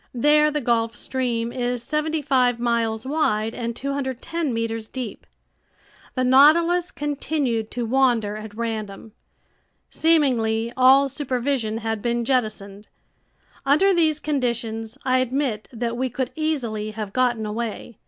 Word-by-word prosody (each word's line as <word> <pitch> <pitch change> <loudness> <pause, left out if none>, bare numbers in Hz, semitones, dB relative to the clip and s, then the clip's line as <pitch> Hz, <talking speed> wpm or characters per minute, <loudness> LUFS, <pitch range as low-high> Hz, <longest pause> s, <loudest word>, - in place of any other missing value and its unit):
There 300 +4 +4
the 300 0 -2
Gulf 230 -2 0
Stream 240 -2 -2
is 245 -1 -2
seventy 305 +3 -1
five 250 -3 +2
miles 230 -2 0
wide 225 -7 0
and 235 -1 -4
210 275 +3 -3
meters 225 -1 -3
deep. 250 -4 -7 0.9
The 255 - +1
Nautilus 330 +7 +5
continued 280 -6 -2
to 240 -1 -3
wander 235 -4 +2
at 215 -1 -8
random. 220 -2 -5 0.8
Seemingly, 240 -8 +2
all 265 +2 +6
supervision 255 -4 -2
had 225 -2 -3
been 235 0 -1
jettisoned. 215 -5 -2 0.8
Under 345 +8 +4
these 315 -3 +2
conditions 235 -6 -2
I 255 0 +3
admit 255 -4 -1
that 235 -1 -3
we 260 +1 -1
could 255 +1 -3
easily 250 -10 -2
have 210 -2 -5
gotten 245 -3 +1
away. 220 +1 -5
245 Hz, 125 wpm, -23 LUFS, 225-280 Hz, 0.9 s, all